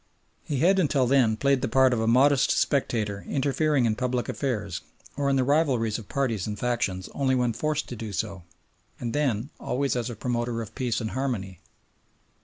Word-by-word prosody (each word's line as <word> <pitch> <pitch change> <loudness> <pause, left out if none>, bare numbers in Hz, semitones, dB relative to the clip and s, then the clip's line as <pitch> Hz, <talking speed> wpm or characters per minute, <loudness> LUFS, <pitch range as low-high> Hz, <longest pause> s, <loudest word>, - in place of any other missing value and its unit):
He 140 -3 -2
had 190 +3 +4
until 140 -6 +2
then 120 -4 +3
played 140 +1 +2
the - - 0
part 130 +2 +4
of 120 - 0
a 110 - 0
modest 130 +4 +4
spectator 110 -8 0
interfering 140 0 +1
in 110 - +2
public 125 0 -1
affairs 105 -9 -3 0.3
or 140 0 0
in 135 - +2
the 130 - +3
rivalries 130 -6 +1
of 105 - -12
parties 115 -9 -1
and 105 -1 -4
factions 105 -6 -1
only 130 -2 +1
when 125 -2 +1
forced 155 +4 -1
to 125 - -5
do 110 -1 -6
so, 100 -1 -3 0.6
and 120 -2 -3
then 135 -3 0
always 140 +1 -1
as 120 0 -2
a 120 - -6
promoter 120 +1 -2
of 105 - -11
peace 125 -2 -1
and 110 - -3
harmony. 110 -9 -3
125 Hz, 190 wpm, -26 LUFS, 110-140 Hz, 0.6 s, had